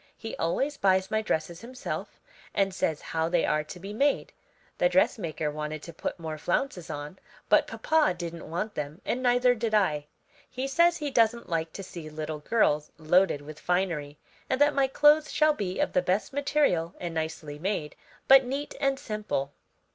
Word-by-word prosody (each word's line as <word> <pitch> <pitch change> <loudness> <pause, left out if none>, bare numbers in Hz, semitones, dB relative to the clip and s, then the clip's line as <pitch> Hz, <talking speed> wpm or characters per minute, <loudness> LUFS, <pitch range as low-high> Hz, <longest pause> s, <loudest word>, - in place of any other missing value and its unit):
He 225 -1 -6
always 270 - 0
buys 190 -1 +2
my 220 0 +2
dresses 170 -4 -2
himself 250 +2 -6 0.4
and 195 -1 +2
says 160 -4 -1
how 160 0 -1
they 175 -1 +2
are 150 0 +1
to 180 - -9
be 195 +3 -7
made. 280 +6 +1 0.5
The - - +4
dressmaker 160 - +1
wanted 150 0 -5
to 170 - -9
put - - -4
more 160 -2 -6
flounces 180 - -1
on, 150 +5 -6 0.3
but - - +5
papa 315 - +2
didn't 170 -2 -6
want 190 +6 -3
them 150 +4 -5
and 250 - -1
neither 245 0 +4
did 225 -2 -1
I. 150 -8 +1 0.4
He 260 +1 -3
says 340 +5 +4
he 295 -2 -3
doesn't 235 -2 +2
like 165 -1 -1
to 195 - -6
see 170 -4 -8
little 155 0 -5
girls 150 -4 +1
loaded 165 -1 +3
with 155 +1 -10
finery, 170 -5 -1 0.3
and 260 - +1
that 290 0 +5
my 275 -1 +3
clothes 295 +3 +4
shall 305 0 +4
be 190 -8 -3
of - - 0
the 180 - +3
best 185 +7 -1
material 275 - +1
and 175 -2 -4
nicely 160 -2 -4
made, 180 -4 -2 0.3
but 270 0 +8
neat 275 +3 -4
and 275 -1 +2
simple." 210 - -3
185 Hz, 180 wpm, -28 LUFS, 160-255 Hz, 0.5 s, but